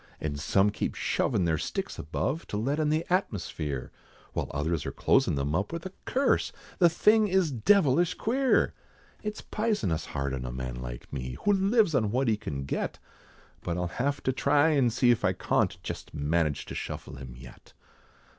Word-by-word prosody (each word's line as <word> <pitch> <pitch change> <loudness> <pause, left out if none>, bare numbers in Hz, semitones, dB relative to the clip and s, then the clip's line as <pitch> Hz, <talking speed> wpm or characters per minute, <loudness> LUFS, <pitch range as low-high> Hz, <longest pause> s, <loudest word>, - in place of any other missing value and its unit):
And 75 -2 -3
some 95 +7 +3
keep 105 - -3
shovin' 105 -8 +1
their 80 -2 +1
sticks - - -4
above, 135 - -2
To 105 - -3
let 135 +8 0
in 155 -1 +2
the 155 +2 +1
atmosphere, 75 - -2 0.4
While - - -2
others 75 +2 -1
are - - -2
closin' - - +2
them 70 +1 -1
up 95 +5 0
with 170 +1 -5
a 190 - -6
curse, 270 +2 +2 0.3
The 175 -2 +7
thing 215 +6 +4
is 190 -5 +2
devilish 165 - +3
queer. 260 +3 +2 0.5
It's 210 0 -4
pisonous 210 - -1
hard 70 -1 -2
on 65 -1 -3
a 60 - -4
man 65 -1 -5
like - - -8
me, 65 -2 -4
Who 205 - +5
lives 200 -1 +3
on 110 -6 +2
what 130 +4 +1
he 110 - +3
can 70 -9 -5
get, 70 - -3 0.7
But 85 0 -2
I'll 90 -1 -1
have 145 +2 -1
to 130 - +1
try 145 +4 +3
and 135 -6 +3
see 120 +1 +4
if 120 - +1
I - - +3
cawnt, - - 0
Jest - - -6
manage 75 0 0
to - - -7
shuffle - - -6
him 65 -2 -9
yet. 60 -1 -14
110 Hz, 185 wpm, -28 LUFS, -, 0.7 s, The